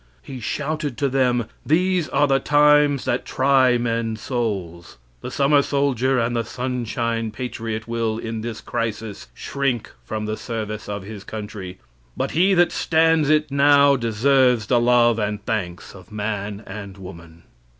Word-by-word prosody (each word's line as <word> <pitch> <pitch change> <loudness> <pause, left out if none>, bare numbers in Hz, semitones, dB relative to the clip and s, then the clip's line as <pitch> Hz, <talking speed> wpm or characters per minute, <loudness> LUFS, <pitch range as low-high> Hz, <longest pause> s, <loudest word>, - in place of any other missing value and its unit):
He 130 -2 -8
shouted 150 +3 -3
to 140 -2 0
them 125 -3 +1 0.2
"These 180 +1 +1
are 145 - +3
the 135 -1 +2
times 145 -1 +4
that 120 - 0
try 130 -2 +3
men's 115 -2 -2
souls." 95 - -4 0.2
The - - -5
summer 140 +1 +3
soldier 135 -2 +1
and 120 0 0
the 115 - 0
sunshine 115 -2 -2
patriot, 115 -1 -5
will, 115 -1 -1
in 115 -1 -5
this 115 -1 -6
crisis, 110 -2 -4
shrink 135 -5 -2
from 105 - -4
the 110 0 -3
service 110 -3 -5
of 100 -1 -4
his 100 0 -9
country; 105 -3 -7 0.4
but - - -1
he 190 +4 +3
that 175 0 +4
stands 160 -2 +2
it 155 -1 +2
now 140 0 +5
deserves 125 0 +2
the 120 +3 +2
love 120 -1 +4
and 105 -1 -3
thanks 95 -6 -4
of 95 0 -15
man 105 0 -4
and 100 -1 -8
woman. 85 -3 -12
120 Hz, 150 wpm, -22 LUFS, 105-140 Hz, 0.4 s, now